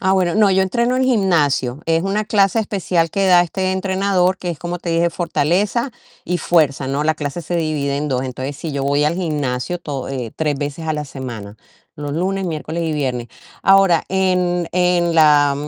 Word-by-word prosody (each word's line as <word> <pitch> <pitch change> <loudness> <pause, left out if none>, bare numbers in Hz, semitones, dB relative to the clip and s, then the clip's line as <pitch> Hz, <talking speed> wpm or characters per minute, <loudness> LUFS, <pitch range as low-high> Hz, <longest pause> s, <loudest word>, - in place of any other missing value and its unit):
Ah, 190 0 +2
bueno, 185 -2 +1
no, 210 -2 +4
yo 190 0 +3
entreno 235 +6 0
en 260 - +2
gimnasio. 155 - +1
Es 165 0 +2
una 200 +2 -1
clase 200 0 +2
especial 185 -5 0
que 195 +4 0
da 180 -2 +6
este 185 +2 -1
entrenador, 190 -1 +1
que 175 -1 -4
es 165 - -6
como 175 0 -4
te 175 - -4
dije, 165 +1 +2
fortaleza 180 - 0 0.3
y 180 - -1
fuerza, 155 -5 +1
¿no? 140 +2 -1
La 155 +1 +1
clase 150 +2 -4
se 175 +1 -3
divide 150 -4 -1
en 150 +1 -2
2. 130 -2 0
Entonces, 130 +2 -5
si 160 +1 -5
yo 140 -1 -2
voy 145 +1 +2
al 150 +3 +1
gimnasio 150 -3 -2
to 145 -6 -5
eh, 125 -5 -4
3 150 -3 0
veces 145 +3 -4
a 155 - 0
la 150 -1 -4
semana, 120 -7 -8 0.4
los 145 -2 -5
lunes, 190 +5 -1
miércoles 165 0 -3
y 160 -1 -1
viernes. 130 -5 -2 0.3
Ahora, 195 -3 +4
en 180 -2 +1
en 180 -1 +2
la 150 -3 +5
170 Hz, 200 wpm, -19 LUFS, 145-185 Hz, 0.4 s, da